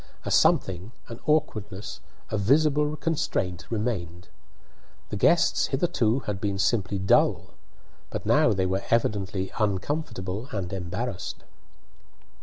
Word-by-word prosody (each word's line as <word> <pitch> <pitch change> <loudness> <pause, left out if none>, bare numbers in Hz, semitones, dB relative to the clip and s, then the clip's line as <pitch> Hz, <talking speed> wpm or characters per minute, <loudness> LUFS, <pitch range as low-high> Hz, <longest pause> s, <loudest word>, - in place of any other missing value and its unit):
A - - -2
something, 95 +5 +2 0.2
an 115 - -7
awkwardness, 105 -9 -1 0.3
a 110 - 0
visible 150 +6 +3
constraint 95 - -2
remained. 95 -7 -3 0.8
The - - -3
guests 170 +11 +3
hitherto 135 -5 +1
had 105 -3 -4
been 100 -2 -1
simply 100 0 +1
dull, 95 +1 +2 0.6
but - - -5
now - - +4
they 95 -2 +1
were 95 +1 0
evidently 100 -4 0
uncomfortable 105 -1 -2
and 95 -3 -3
embarrassed. 95 +3 -4
105 Hz, 110 wpm, -26 LUFS, 95-125 Hz, 0.8 s, now